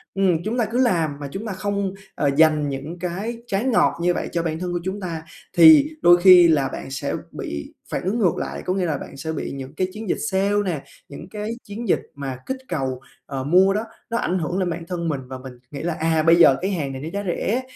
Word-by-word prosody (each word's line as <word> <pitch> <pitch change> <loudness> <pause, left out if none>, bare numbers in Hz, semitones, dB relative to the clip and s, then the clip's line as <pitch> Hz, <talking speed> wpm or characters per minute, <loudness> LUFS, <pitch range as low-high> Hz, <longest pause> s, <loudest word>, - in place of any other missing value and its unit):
Ừm, 190 -4 +3
chúng 225 +3 -1
ta 235 - +2
cứ 225 +3 -3
làm 165 - 0
mà 145 - -5
chúng 200 +8 -5
ta 210 - -3
không, 200 0 -2 0.2
ờ, 145 - +1
dành 155 -2 +4
những 140 +6 -6
cái 195 +7 -4
trái 200 -1 0
ngọt 250 -9 +3
như 175 +1 +2
vậy - - -3
cho 170 - -1
bản 160 -1 -2
thân 180 0 -3
của 175 - -1
chúng 190 +3 -3
ta 170 -4 -5 0.3
thì 165 - +8
đôi 175 0 +7
khi 180 -2 +9
là 145 -5 +3
bạn 135 - -7
sẽ 135 - -3 0.2
bị 70 0 -6 0.2
phản - - -3
ứng 200 +6 -1
ngược 185 -6 +2
lại. - - -4
Có 180 - 0
nghĩa 190 -1 0
là 155 -4 -1
bạn - - -10
sẽ 160 +3 -4
bị - - -4
những 135 0 -7
cái 185 +3 0
chiến 215 -1 -7
dịch - - +1
sale 195 +2 +1
nè, 165 -7 -2 0.3
những 150 +5 -10
cái 210 +1 -5
chiến 220 +3 -7
dịch - - +4 0.2
mà 135 -2 -5
kích 265 - -3
cầu, 130 -6 -3 0.2
ờ, 135 -2 -4
mua 185 +7 +4
đó, 210 +2 -1 0.3
nó 230 - -1
ảnh 185 -5 0
hưởng 170 +2 -2
lên 185 -2 0
bản 170 0 -4
thân 170 -2 -3
mình, 140 -3 -2
và 130 0 -6
mình 130 0 -10 0.2
nghĩ 145 - -6
là, 175 0 -1
à, 160 -1 +2
bây 165 +1 +6
giờ 165 -6 +6
cái 190 +2 -1
hàng 145 -7 -2
này 130 - -6
nó 155 - -5
giá 200 0 -2
rẻ, 215 +7 0
175 Hz, 255 wpm, -22 LUFS, 150-195 Hz, 0.3 s, khi